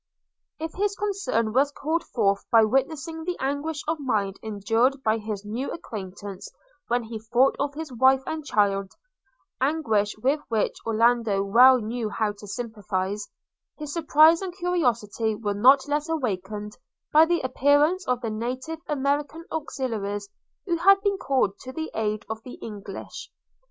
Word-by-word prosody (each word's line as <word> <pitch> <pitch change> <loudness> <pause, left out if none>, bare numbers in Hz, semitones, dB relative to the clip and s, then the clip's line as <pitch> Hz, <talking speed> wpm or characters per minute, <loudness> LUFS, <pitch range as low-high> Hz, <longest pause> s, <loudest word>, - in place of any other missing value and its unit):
If 320 0 -5
his 405 +1 -1
concern 360 - -1
was 280 +3 +3
called 320 +4 -2
forth 200 -4 0
by 225 -1 +6
witnessing 285 +7 -1
the 355 +1 -3
anguish 285 +3 -2
of 320 0 -1
mind 205 -8 -1
endured 225 +6 0
by 220 +1 +2
his 210 -1 -5
new 230 +6 -3
acquaintance 200 - -7 0.4
when 240 0 +1
he 225 0 -6
thought 240 +5 +2
of 285 0 -1
his 310 -3 -6
wife 265 +2 +4
and 315 -1 -4
child 200 -6 +1 0.4
– 260 - -45
anguish 220 -11 0
with 270 +7 +1
which 220 -3 0
Orlando 225 -3 +2
well 250 +6 +7
knew 225 0 -3
how 210 +1 0
to 205 - -10
sympathise 205 -3 -3 0.2
– - - -63
his 300 -2 -6
surprise 320 0 +5
and 370 -1 -6
curiosity 235 - 0
were 205 -1 -2
not 265 +7 +5
less 295 +2 -1
awakened 210 - -3 0.4
by 310 +2 +8
the 345 0 +1
appearance 290 +7 +2
of 250 -1 0
the 225 -3 -3
native 255 +8 -4
American 290 +3 -1
auxiliaries 225 -10 -3 0.4
who 345 -3 0
had 390 +3 +6
been 400 -1 0
called 255 - 0
to 260 - -8
the 320 +2 -4
aid 215 -1 -2
of 220 0 -5
the 250 - -10
English. 205 -3 -8
250 Hz, 155 wpm, -25 LUFS, 215-300 Hz, 0.4 s, by